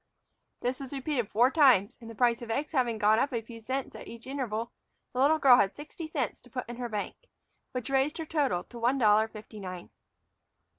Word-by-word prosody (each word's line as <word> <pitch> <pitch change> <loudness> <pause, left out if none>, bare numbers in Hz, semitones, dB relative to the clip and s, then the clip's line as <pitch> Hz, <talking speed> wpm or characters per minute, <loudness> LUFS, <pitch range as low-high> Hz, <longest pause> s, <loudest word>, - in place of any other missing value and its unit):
This 250 +1 -1
was 275 0 -7
repeated 270 -5 -2
four 245 +5 +4
times, 255 - +5
and, 230 - -9
the 230 - -9
price 240 0 +2
of 235 - -8
eggs 280 +6 -1
having 245 -6 +1
gone 215 +1 +4
up 280 - +1
a 230 -2 -2
few 230 0 -11
cents 260 +4 -3
in - - -9
each 235 0 -10
interval, 240 -4 -3 0.4
the 250 - -3
little 295 +4 +5
girl 265 -5 +7
had 200 -2 +2
sixty 305 +2 -8
cents 280 -7 -3
to 250 - -17
put 250 0 -5
in 240 0 -7
her 245 -1 -4
bank, 210 -2 -4 0.5
which 250 -3 -4
raised 270 +3 +2
her 325 - -4
total 285 - 0
to 240 - -11
one 245 +4 +2
dollar 215 -2 +4
fifty 215 0 -11
nine. 185 -2 -7
245 Hz, 215 wpm, -29 LUFS, 220-270 Hz, 0.5 s, girl